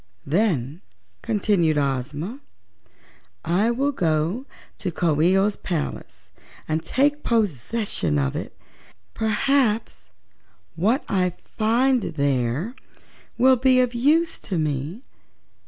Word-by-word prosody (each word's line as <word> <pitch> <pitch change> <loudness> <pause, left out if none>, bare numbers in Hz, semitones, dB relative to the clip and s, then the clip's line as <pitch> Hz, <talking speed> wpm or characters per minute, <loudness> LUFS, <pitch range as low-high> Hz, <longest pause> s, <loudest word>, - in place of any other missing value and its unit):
"Then," 160 - 0 0.4
continued 185 -7 +1
Ozma, 145 - -2 1.1
"I 185 +7 +2
will 270 +4 +1
go 170 - -1 0.3
to - - -2
Coo 160 -3 +1
ee 180 +4 +4
oh's 200 +1 +1
palace 165 -5 -5 0.4
and 155 +1 0
take 290 +3 +1
possession 210 - 0
of 70 -1 0
it. - - -6 0.6
Perhaps 220 - 0 0.7
what 220 - +1
I 185 -2 +1
find 235 +7 +1
there 140 - -1 0.6
will 260 +1 +5
be 255 +1 +4
of 250 -1 +2
use 310 +7 +2
to 190 - -4
me. 155 - -2
195 Hz, 105 wpm, -23 LUFS, 155-240 Hz, 1.1 s, will